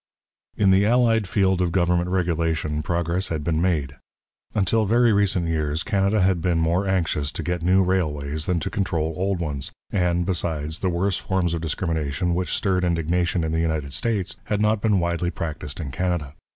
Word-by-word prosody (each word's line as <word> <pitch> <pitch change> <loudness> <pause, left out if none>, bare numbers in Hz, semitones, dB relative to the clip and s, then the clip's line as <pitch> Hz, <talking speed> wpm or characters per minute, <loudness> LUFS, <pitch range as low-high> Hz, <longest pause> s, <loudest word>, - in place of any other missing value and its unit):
In 100 -2 +4
the 95 +1 +5
allied 115 -2 +3
field 95 -2 +2
of 90 -2 +1
government 90 -1 +1
regulation 80 -4 0
progress 85 +3 -1
had 80 -3 -3
been 80 0 0
made. 75 -7 0 0.6
Until 105 +2 +2
very 120 +1 +4
recent 100 -4 +1
years, 80 -1 -1
Canada 100 0 +1
had 95 -2 +2
been 85 0 +1
more 85 +4 +1
anxious 85 -6 0
to - - -4
get 90 -1 -2
new 95 +3 +4
railways 75 -5 -1
than 90 -2 +1
to - - -3
control 80 -5 -1
old 95 +1 -1
ones, 75 -5 -3 0.2
and, 90 -2 +1
besides, 80 -3 -2
the 95 - 0
worse 90 +2 0
forms 95 -4 -1
of 85 - -2
discrimination 80 0 -1
which 90 +1 -2
stirred 95 -2 +1
indignation 85 +1 0
in 80 - -1
the 80 0 0
United 80 -4 -2
States 100 - -1
had 105 - -1
not 105 0 +2
been 105 -3 +2
widely 85 0 -1
practised 75 -4 -5
in 75 -5 -5
Canada. 85 -2 -2
85 Hz, 180 wpm, -23 LUFS, 80-95 Hz, 0.6 s, the